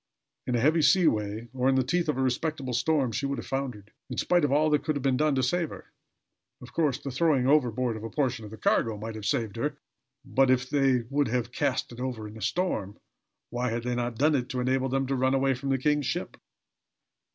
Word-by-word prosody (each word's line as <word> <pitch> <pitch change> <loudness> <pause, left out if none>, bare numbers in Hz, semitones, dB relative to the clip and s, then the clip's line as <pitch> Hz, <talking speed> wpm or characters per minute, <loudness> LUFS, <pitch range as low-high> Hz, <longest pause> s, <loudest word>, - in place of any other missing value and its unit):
In 125 - 0
a - - +2
heavy 155 +6 +3
seaway, 120 - +2
or 130 0 +1
in 135 - +3
the 130 - +3
teeth 170 +5 0
of 150 - 0
a 135 - +1
respectable 130 0 -1
storm, 130 0 +1
she 140 +5 -2
would 140 0 -2
have - - -6
foundered, 125 -7 -4 0.2
in - - -5
spite 175 -2 +2
of 145 - +2
all 150 +2 +3
that 150 - +2
could 155 - -1
have 140 - -3
been 135 -2 +2
done 150 +1 +2
to 130 - +1
save 165 +5 0
her. - - -11 0.7
Of 125 -2 -13
course, 150 -6 +1
the 140 -1 -6
throwing 140 -2 +2
overboard 125 -4 +2
of 110 - -7
a 115 - -4
portion 130 -5 -1
of 105 - -8
the 110 - -10
cargo 110 0 +1
might 110 +2 -6
have 110 -1 -5
saved 115 -8 -1
her; - - -2 0.5
but, 135 -1 +2
if 130 0 +2
they 135 -4 +3
would 145 0 +2
have 120 +1 -1
cast 135 -1 -1
it 120 - -10
over 125 -4 -4
in 105 - -11
a 110 - -10
storm, 110 - -1 0.5
why 125 +1 -1
had 115 +1 -3
they 125 0 -1
not 120 -1 -2
done 150 +4 +3
it 125 -3 0
to 125 - -3
enable 130 +1 +1
them 135 +1 0
to 135 +1 -1
run 130 +1 +2
way 135 0 +2
from 135 +2 -5
the 135 - +2
king's 150 +1 +1
ship? - - -3
130 Hz, 240 wpm, -27 LUFS, 120-145 Hz, 0.7 s, heavy